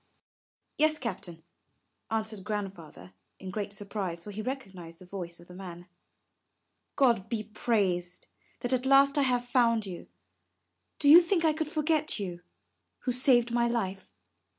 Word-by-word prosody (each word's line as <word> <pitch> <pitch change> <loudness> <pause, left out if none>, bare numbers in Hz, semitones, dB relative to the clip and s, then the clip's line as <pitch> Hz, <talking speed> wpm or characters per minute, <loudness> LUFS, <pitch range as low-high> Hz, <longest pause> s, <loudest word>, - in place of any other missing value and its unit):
Yes, 310 0 +3
Captain," 175 - -6 0.7
answered 220 -2 -3
Grandfather 185 - -6 0.2
in 190 -1 -8
great 205 0 -4
surprise, 195 -4 -4
for 210 - -8
he 210 +2 -5
recognized 195 -10 -6
the 185 - -14
voice 175 -2 -7
of 175 - -16
the 180 - -12
man. 180 -2 -9 1.1
God 235 -7 +2
be 225 -3 -2
praised, 195 -5 -1 0.4
that 245 +1 -1
at 255 +1 0
last 275 +1 +6
I - - +4
have 250 -2 +1
found 235 -3 +2
you. 180 -3 -8 0.9
Do - - 0
you 325 +5 +10
think 340 -1 +1
I 315 - +4
could 315 0 -3
forget 310 0 +1
you, 180 -4 -5 0.6
who 255 - -1
saved 245 -1 +4
my 235 0 +2
life? 195 -5 -3
215 Hz, 150 wpm, -29 LUFS, 185-255 Hz, 1.1 s, you